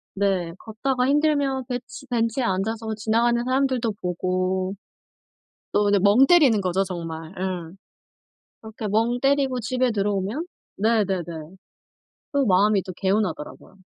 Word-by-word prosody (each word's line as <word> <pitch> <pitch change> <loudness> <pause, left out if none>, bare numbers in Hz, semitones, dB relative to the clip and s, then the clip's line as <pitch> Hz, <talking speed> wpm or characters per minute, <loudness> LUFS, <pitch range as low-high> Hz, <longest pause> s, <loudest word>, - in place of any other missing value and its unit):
네 190 -4 0
걷다가 250 +3 -1
힘들면 285 -3 +1
벤치 250 +2 -6
벤치에 235 +1 0
앉아서 220 +2 -2
지나가는 235 +2 +1
사람들도 255 -2 +1
보고 185 +1 -1 1.0
또 205 - +3
그냥 205 -2 +3
멍 210 +7 +6
때리는 280 -11 +5
거죠 190 +1 0
정말. 165 -2 -6
예. 180 -3 -4 0.9
그렇게 220 0 -7
멍 225 +4 +1
때리고 275 -2 +2
집에 255 +2 0
들어오면 205 - -1 0.3
네네네 200 -4 +1 1.1
또 280 -3 +2
마음이 200 +1 +3
또 185 - -7
개운하더라고요. 190 -5 -2
220 Hz, 280 characters per minute, -24 LUFS, 190-250 Hz, 1.1 s, 멍